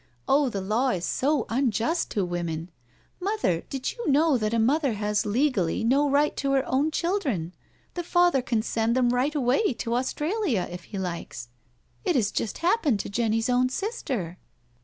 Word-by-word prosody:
Oh, 280 -1 +3
the 200 -4 -3
law 220 +7 +1
is 180 -7 -1
so 290 +2 +1
unjust 255 - 0
to 200 -3 -1
women 170 -1 -4
I 125 - -22
Mother, 400 - 0
did 265 -1 -3
you 475 -9 -4
know 295 +1 +4
that 215 -3 0
a 230 - +1
mother 270 +3 +2
has 210 +1 -1
legally 225 - +1
no 275 +5 +3
right 285 +2 +2
to 275 -1 0
her 270 -1 +2
own 275 +4 +1
children 300 - -1 0.2
— - - -37
^the 350 - -3
father 350 -5 +3
can 230 -3 -1
send 225 +1 0
them 250 -2 +3
right 255 +5 +1
away 275 - +2
to 230 0 -3
Australia, 290 - -1
if 180 -1 -8
he 200 - -7
likes? 170 -10 -5 0.5
It 360 -5 +1
has 215 -6 +2
just 215 - -2
happened 330 - +2
to - - -7
Jenny's 225 +1 0
own 250 0 +2
sister." 260 - -4
250 Hz, 180 wpm, -26 LUFS, 205-295 Hz, 0.5 s, know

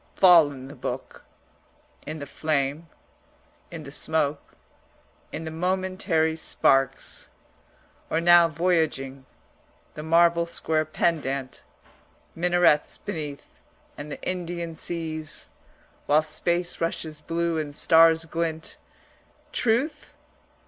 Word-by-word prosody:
Fallen 150 -8 +5
the 140 - -10
book; - - -6 0.8
in 155 - -4
the 145 - -6
flame, 145 +1 -2 0.8
in 165 -2 -8
the 140 - -10
smoke, 150 -1 -2 0.8
in 160 - -5
the 160 - -5
momentary 180 -2 0
sparks 135 -4 0 0.8
or 160 - +1
now 175 0 +7
voyaging, 155 -6 -1 0.7
the 150 - -7
marble 170 +1 +3
square 160 -2 -1
pendant, 140 -5 -2 0.7
minarets 175 -3 +2
beneath 155 -8 -6 0.5
and 145 +1 -8
the - - -6
Indian 170 -2 -4
seas, 160 -1 -5 0.6
while 150 +2 +4
space 170 +3 -1
rushes 160 -2 -3
blue 170 0 -1
and 145 -2 -5
stars 165 +1 +5
glint 160 0 -4 0.7
truth? 265 +7 -1
160 Hz, 100 wpm, -25 LUFS, 150-170 Hz, 0.8 s, now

